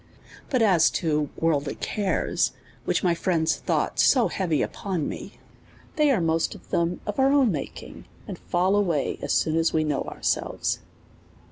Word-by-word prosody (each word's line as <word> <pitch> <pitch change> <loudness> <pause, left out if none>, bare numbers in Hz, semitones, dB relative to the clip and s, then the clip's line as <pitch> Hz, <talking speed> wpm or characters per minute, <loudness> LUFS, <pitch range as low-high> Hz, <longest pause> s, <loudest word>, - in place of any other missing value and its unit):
But 255 -4 +2
as 180 -7 +5
to 150 -3 0
worldly 150 -3 0
cares, 200 -3 -1 0.3
which - - 0
my 175 -2 +3
friends 170 -2 0
thought - - 0
90 245 -3 +1
heavy 165 -6 0
upon 185 -7 -3
me, - - -7 0.6
they 300 -1 +3
are 255 -7 +3
most 165 -1 0
of - - -16
them 170 +1 0
of 210 +4 -4
our 265 +1 +4
own 275 -6 +4
making, 150 - -7 0.2
and - - -7
fall 185 +3 +1
away 175 -8 0
as - - -3
soon 155 - +2
as 165 0 +1
we 155 - +2
know 150 -3 -1
ourselves. - - -2
170 Hz, 160 wpm, -25 LUFS, 160-205 Hz, 0.6 s, as